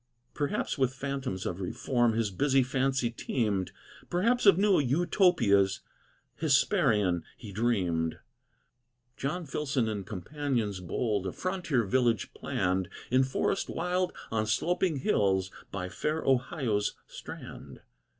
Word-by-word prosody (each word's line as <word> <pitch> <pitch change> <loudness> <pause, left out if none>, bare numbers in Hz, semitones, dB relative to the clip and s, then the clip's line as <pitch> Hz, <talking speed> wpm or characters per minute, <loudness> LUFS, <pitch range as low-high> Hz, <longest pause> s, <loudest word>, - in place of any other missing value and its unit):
Perhaps 145 -1 -2
with 130 0 +1
phantoms 135 -9 -3
of 90 +2 -3
reform 120 +5 +1
His 110 -2 0
busy 135 +7 +3
fancy 130 -1 0
teemed, 105 -5 -1 0.4
Perhaps 225 +6 +2
of 195 - +8
new 200 -1 +4
Utopias 140 - +3 0.6
Hesperian 95 -5 +2
he 110 -4 -9
dreamed. 95 -7 0 1.0
John 165 +6 -3
Filson 140 -5 -1
and 105 -3 -3
companions 110 - -2
bold 100 +2 -1
A - - -2
frontier 180 - -1
village 115 +2 +1
planned, 90 0 -1 0.2
In 130 +1 +5
forest 130 +8 -1
wild, 180 +1 0 0.2
on 110 -1 0
sloping 170 - +1
hills, 95 -7 +1 0.2
By 90 -2 -4
fair 150 - -2
Ohio's 125 -5 +1
strand. - - -10
120 Hz, 115 wpm, -29 LUFS, 100-145 Hz, 1.0 s, of